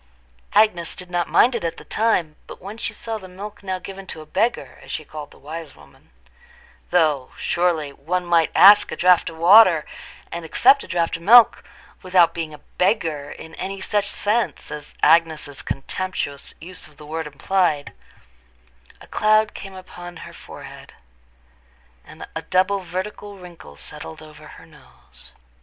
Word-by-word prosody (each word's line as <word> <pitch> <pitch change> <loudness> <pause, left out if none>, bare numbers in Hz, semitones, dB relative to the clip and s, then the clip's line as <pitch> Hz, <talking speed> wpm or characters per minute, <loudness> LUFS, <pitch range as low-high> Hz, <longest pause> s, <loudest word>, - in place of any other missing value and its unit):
Agnes 205 -5 +2
did 180 -1 -9
not 175 -1 -1
mind 250 - +4
it 235 - -3
at 165 - -3
the - - -12
time, 185 -9 0
but - - -11
when 200 +3 -9
she 230 - -4
saw 225 -1 -6
the 190 - -11
milk 200 +3 -10
now 190 -2 -3
given 195 +1 -10
to - - -7
a 155 - -10
beggar, 230 +9 -2
as - - -11
she 155 - -4
called 150 -1 -9
the - - -18
wise 155 0 -9
woman—though, 130 - -4
surely, 165 -5 0
one 175 +6 -3
might 170 -2 +3
ask 205 +1 +7
a - - -3
draught 180 -1 +3
of 165 - -12
water, 175 -2 +6 0.5
and 170 0 -5
accept 265 - +4
a - - -12
draught 170 -2 -1
of - - -17
milk, 230 +6 +6 0.4
without 180 -2 +3
being 165 -2 -4
a 150 - -10 0.2
beggar 165 -7 0
in 160 +2 -11
any 195 +3 -5
such 205 +1 -1
sense 215 -3 -2
as 150 -1 -8
Agnes's 155 -3 +2
contemptuous 145 -1 -4
use 180 +3 -11
of 150 -1 -22
the 150 - -12
word 160 +1 -5
implied—a 150 0 -1 1.1
cloud 215 0 +2
came 195 -1 -9
upon 175 -2 -10
her - - -12
forehead, - - -12 1.1
and - - -11
a - - -3
double 190 +2 +1
vertical 195 +3 -6
wrinkle 170 - -13
settled 80 - -10
over 150 0 -14
her - - -14
nose. 65 - -19
175 Hz, 160 wpm, -22 LUFS, 155-195 Hz, 1.1 s, ask